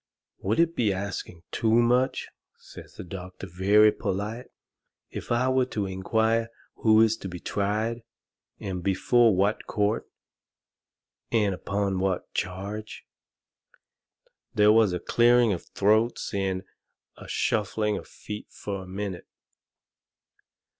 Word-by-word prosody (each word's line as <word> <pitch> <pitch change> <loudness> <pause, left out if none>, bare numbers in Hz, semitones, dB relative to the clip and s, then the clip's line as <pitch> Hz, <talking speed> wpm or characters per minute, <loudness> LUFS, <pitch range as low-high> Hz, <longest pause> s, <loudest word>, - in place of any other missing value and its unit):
"Would 105 +8 0
it 170 0 +3
be 110 -4 +2
asking 95 -3 -5
too 110 - 0
much," 125 +3 +2 0.3
says - - -13
the - - -7
doctor 90 +1 -8
very 100 +4 +4
polite, 105 +7 -4 0.6
"if - - -7
I 120 +2 +2
were 130 -1 +2
to 105 -5 -2
inquire 110 +4 0 0.3
who 110 -1 +5
is 110 -1 +4
to 95 - -7
be 90 0 -7
tried, 110 +5 -1 0.6
and 95 -2 -4
before 110 +4 +3
what 100 +3 0
court, 105 +2 0 1.2
and 105 -4 +2
upon 100 0 -2
what 95 -1 -2
charge?" 100 +4 -5 1.5
There 105 0 +6
was 110 -3 +5
a 90 - -2
clearing 120 0 +4
of 85 - -6
throats 110 +4 +1
and 95 -1 -1 0.5
a - - -12
shuffling 105 0 0
of - - -7
feet 105 0 -8
fur 100 -1 -5
a 95 - -10
minute. 95 -1 -5
105 Hz, 125 wpm, -26 LUFS, 95-115 Hz, 1.5 s, There